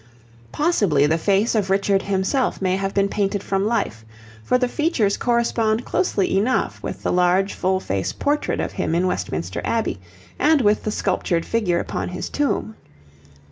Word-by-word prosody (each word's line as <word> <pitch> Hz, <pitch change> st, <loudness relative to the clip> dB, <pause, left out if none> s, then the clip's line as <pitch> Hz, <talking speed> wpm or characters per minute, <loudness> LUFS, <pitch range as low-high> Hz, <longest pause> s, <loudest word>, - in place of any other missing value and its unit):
Possibly 200 Hz, -, +2 dB
the 160 Hz, +2 st, +1 dB
face 200 Hz, +5 st, +2 dB
of 205 Hz, -4 st, 0 dB
Richard 195 Hz, 0 st, +2 dB
himself 200 Hz, +8 st, 0 dB
may 185 Hz, -1 st, +1 dB
have 195 Hz, 0 st, -2 dB
been 200 Hz, 0 st, +2 dB
painted 200 Hz, 0 st, -1 dB
from 195 Hz, +1 st, 0 dB
life, 205 Hz, -, -1 dB, 0.4 s
for 250 Hz, -, +2 dB
the 250 Hz, 0 st, +1 dB
features 245 Hz, -, +1 dB
correspond 235 Hz, -2 st, +1 dB
closely 200 Hz, -, 0 dB
enough 250 Hz, +6 st, 0 dB
with -, -, -6 dB
the -, -, 0 dB
large 180 Hz, +2 st, +2 dB
full 185 Hz, +1 st, 0 dB
face 95 Hz, -, -2 dB
portrait 290 Hz, +1 st, -1 dB
of -, -, -2 dB
him 165 Hz, -, -2 dB
in 175 Hz, +2 st, +2 dB
Westminster 90 Hz, -, -3 dB
Abbey, 225 Hz, -, -1 dB, 0.4 s
and 305 Hz, +1 st, +4 dB
with 210 Hz, -2 st, +2 dB
the 215 Hz, -, 0 dB
sculptured 180 Hz, -4 st, -1 dB
figure 210 Hz, -7 st, 0 dB
upon -, -, -3 dB
his 180 Hz, -, -5 dB
tomb. 285 Hz, -6 st, -1 dB
200 Hz, 165 wpm, -22 LUFS, 185-230 Hz, 0.4 s, and